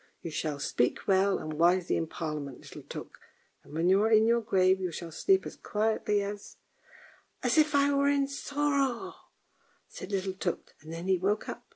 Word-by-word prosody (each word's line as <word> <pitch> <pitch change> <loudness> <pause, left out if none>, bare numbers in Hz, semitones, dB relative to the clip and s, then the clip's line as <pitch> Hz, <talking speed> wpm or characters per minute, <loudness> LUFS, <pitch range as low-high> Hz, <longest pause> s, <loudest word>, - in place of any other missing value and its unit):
"You 165 - -5
shall 150 -1 -2
speak 125 -3 -1
well 195 0 +3
and 155 - -5
wisely 175 +3 +3
in 165 - -1
Parliament, 150 -5 -5
little - - -10
Tuk; - - -9 0.4
and - - -17
when 165 +3 0
you 190 +2 +5
are 220 - +3
in 220 0 +5
your 235 +1 +3
grave 190 -3 +2
you 180 -2 -2
shall 165 +1 -7
sleep 380 - +2
as - - -7
quietly 210 -1 0
as 205 0 -7 0.3
" - - -22
" - - -35
As - - +2
if 305 -1 +3
I 285 0 +4
were 280 0 +3
in 280 -1 +2
Soro! 280 +3 -1 0.4
" - - -39
said 185 - -7
little 190 -1 -1
Tuk, 185 -2 -4
and 155 +2 -11
then 165 +2 -6
he 190 -1 +3
woke 205 +4 0
up. - - -7
195 Hz, 205 wpm, -29 LUFS, 170-235 Hz, 0.4 s, you